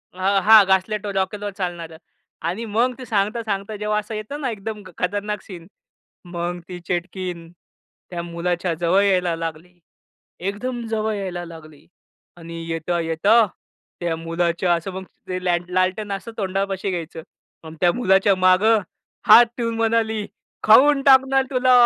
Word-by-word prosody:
अ, - - -18 0.3
हां. 220 -1 +9
घासलेटवर 200 +2 0
रॉकेलवर 200 +2 -2
चालणारं 170 -4 -5 0.5
आणि 195 +7 -3
मग 230 +4 +1
ती 255 - -8
सांगता 215 +1 0
सांगता 205 0 -3
जेव्हा 210 0 -1
असं 210 +1 -7
येतं 215 +8 -6
ना, 265 - -1
एकदम 215 -1 -6 0.2
खतरनाक 205 +2 -2
सीन. 175 -4 -11 0.6
मग 175 0 -4
ती 180 -1 -7
चेटकीन 175 -1 -4 0.6
त्या 175 -1 -4
मुलाच्या 170 +1 -2
जवळ 175 +3 +3
यायला 180 -4 +2
लागली. 165 +2 -7 0.6
एकदम 205 +7 -3
जवळ 220 -1 -1
यायला 185 -3 -4
लागली 155 -3 -13 0.5
आणि 165 -1 -8
येता-येता 170 +6 +2 0.6
त्या 170 -2 -1
मुलाच्या 170 +2 0
असं 170 +3 -4
मग 190 +1 -6 0.3
ते 185 0 -3
ल्याल 175 -1 +2
लालटेन 185 +3 0
असं 195 +4 -6
तोंडापाशी 195 0 -2
घ्यायचं. 165 -2 -5 0.4
मग 160 0 -9
त्या 175 -1 +4
मुलाच्या 195 -3 +3
मागे 185 +4 +4 0.5
हात 240 - +9
ठेऊन 230 -1 -1
म्हणाली, 225 -2 0 0.4
खाऊन 275 +6 +6
टाकणार 270 0 +5
तुला. 255 -1 +3
190 Hz, 140 wpm, -22 LUFS, 175-215 Hz, 0.6 s, हां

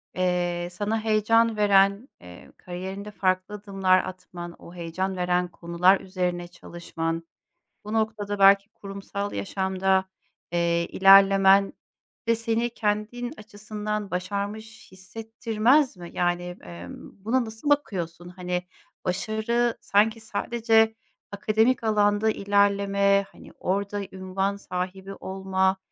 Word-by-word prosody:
eee, 175 -1 0
sana 210 +5 -2
heyecan 225 +1 +3
veren, 200 +3 +3
eee, 90 0 -13
kariyerinde 190 +3 -7
farklı 185 0 -1
adımlar 195 -2 +2
atman, 175 -2 -8
o 170 - -13
heyecan 180 +3 -3
veren 180 0 +1
konular 175 +2 +2
üzerine 180 -2 -3
çalışman, 165 -1 -5 0.6
bu 210 - -5
noktada 210 -2 -1
belki 195 +1 +6
kurumsal 200 0 -6
yaşamda, 190 -1 0 0.5
eee, 170 0 +1
ilerlemen 195 0 +6 0.5
de 230 - +4
seni 230 +1 -1
kendin 225 +2 -2
açısından 210 -1 -5
başarmış 205 +5 -5
hissettirmez 225 +6 0
mi? 175 -1 -9
Yani, 175 0 0 0.2
emm, 85 - -11
buna 245 +2 +1
nasıl 220 +6 -5
bakıyorsun? 175 - -1
Hani, 180 0 -3 0.4
başarı 220 +5 0
sanki 215 +2 +2
sadece 225 0 +1 0.4
akademik 220 +5 +1
alanda 210 0 +2
ilerleme, 200 -1 +2
hani, - - -15
orada 200 +2 -1
ünvan 190 +1 -2
sahibi 190 0 -5
olma, 190 0 -1
200 Hz, 105 wpm, -25 LUFS, 185-215 Hz, 0.6 s, belki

